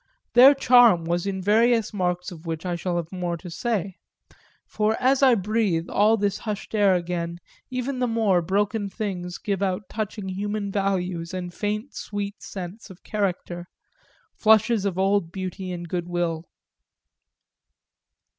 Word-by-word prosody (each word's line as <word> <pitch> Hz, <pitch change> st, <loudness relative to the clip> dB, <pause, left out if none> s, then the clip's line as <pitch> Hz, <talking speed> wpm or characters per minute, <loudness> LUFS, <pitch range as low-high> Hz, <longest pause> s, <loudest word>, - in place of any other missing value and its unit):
Their 260 Hz, +4 st, +9 dB
charm 245 Hz, -10 st, +6 dB
was 175 Hz, +3 st, -1 dB
in 190 Hz, -1 st, -3 dB
various 225 Hz, +2 st, +3 dB
marks 180 Hz, -2 st, -1 dB
of 165 Hz, -1 st, -11 dB
which 165 Hz, +1 st, -4 dB
I 175 Hz, -1 st, -1 dB
shall 175 Hz, +1 st, -2 dB
have 170 Hz, -1 st, -4 dB
more 175 Hz, -2 st, -3 dB
to 170 Hz, +2 st, -10 dB
say 200 Hz, -1 st, -2 dB, 0.7 s
for 215 Hz, +1 st, 0 dB
as 260 Hz, +2 st, +3 dB
I 260 Hz, -3 st, +6 dB
breathe 200 Hz, -5 st, 0 dB
all 215 Hz, +2 st, +4 dB
this 205 Hz, -1 st, -1 dB
hushed 215 Hz, -1 st, -5 dB
air 205 Hz, -3 st, +4 dB
again 170 Hz, -1 st, -3 dB, 0.3 s
even 255 Hz, +1 st, -3 dB
the 250 Hz, -, +1 dB
more 220 Hz, -6 st, +2 dB
broken 205 Hz, +4 st, 0 dB
things 185 Hz, -4 st, -4 dB
give 200 Hz, -2 st, -3 dB
out 190 Hz, 0 st, -1 dB
touching 215 Hz, -2 st, -4 dB
human 205 Hz, +1 st, -3 dB
values 185 Hz, -3 st, -1 dB
and 180 Hz, -1 st, -5 dB
faint 210 Hz, +7 st, -3 dB
sweet 205 Hz, -1 st, -5 dB
scents 190 Hz, +4 st, -8 dB
of 190 Hz, -1 st, -14 dB
character, 180 Hz, -4 st, -3 dB, 0.7 s
flushes 220 Hz, -1 st, +3 dB
of 190 Hz, -3 st, -1 dB
old 195 Hz, -3 st, +1 dB
beauty 185 Hz, 0 st, -5 dB
and 175 Hz, -1 st, -5 dB
good 175 Hz, 0 st, -3 dB
will. 170 Hz, -2 st, -2 dB
195 Hz, 150 wpm, -24 LUFS, 175-215 Hz, 0.7 s, Their